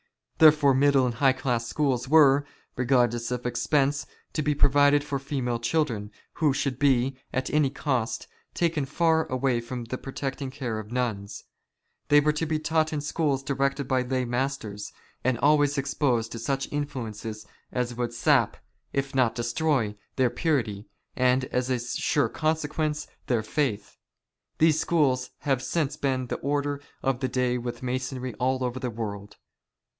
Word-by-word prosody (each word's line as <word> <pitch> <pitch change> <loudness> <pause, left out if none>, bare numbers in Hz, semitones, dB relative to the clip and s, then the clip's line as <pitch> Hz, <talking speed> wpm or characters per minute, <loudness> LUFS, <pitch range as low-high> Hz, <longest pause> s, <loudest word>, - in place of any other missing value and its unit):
Therefore, 150 -3 +7
middle 135 0 +4
and 125 - -1
high 130 +2 +3
class 120 -3 -1
schools 135 -4 0
were, 145 -2 +6 0.3
regardless 120 -2 +2
of 125 0 -3
expense, 140 +3 +1 0.3
to 155 - 0
be 150 0 +1
provided 145 +1 +4
for 140 -2 -3
female 130 -3 -2
children, 115 -5 -1 0.3
who 150 -3 +4
should 135 -2 -2
be, 135 -2 +2
at 130 0 -2
any 150 -2 +3
cost, 130 -4 -2 0.3
taken 165 -4 +1
far 160 +2 +2
away 130 -2 0
from 120 +1 -5
the 120 +2 -5
protecting 135 0 -4
care 125 -5 -4
of 105 +1 -9
nuns. 115 -5 -3 0.6
They 145 - +6
were 150 +1 +3
to 160 +1 -2
be 155 0 0
taught 155 0 +1
in 150 -2 -2
schools 145 -2 0
directed 140 0 -1
by 130 -1 +2
lay 130 0 -1
masters, 120 -5 -3 0.3
and 130 -1 +1
always 145 +1 +3
exposed 135 -4 0
to 115 - -5
such 135 +3 -1
influences 115 -7 -4 0.3
as 125 -1 -1
would 120 0 -2
sap, 120 - +2 0.3
if 135 0 -2
not 130 -4 +2
destroy, 120 -2 0 0.2
their 130 -3 +2
purity, 120 -8 -1 0.3
and, 130 +1 +3
as 125 0 -2
a 130 - +2
sure 125 +4 0
consequence, 155 -1 -1 0.2
their 120 -3 +1
faith. 110 -4 -2 0.6
These 155 -1 +4
schools 135 -7 +1
have 135 -4 +1
since 145 +1 -1
been 130 -2 -1
the - - -3
order 145 0 -1 0.2
of 135 -2 +1
the 130 - 0
day 125 -1 0
with 120 +1 -6
Masonry 130 0 -3
all 130 +1 +1
over 125 +1 -2
the 130 -1 -2
world. 105 -3 -6
130 Hz, 160 wpm, -26 LUFS, 120-145 Hz, 0.6 s, Therefore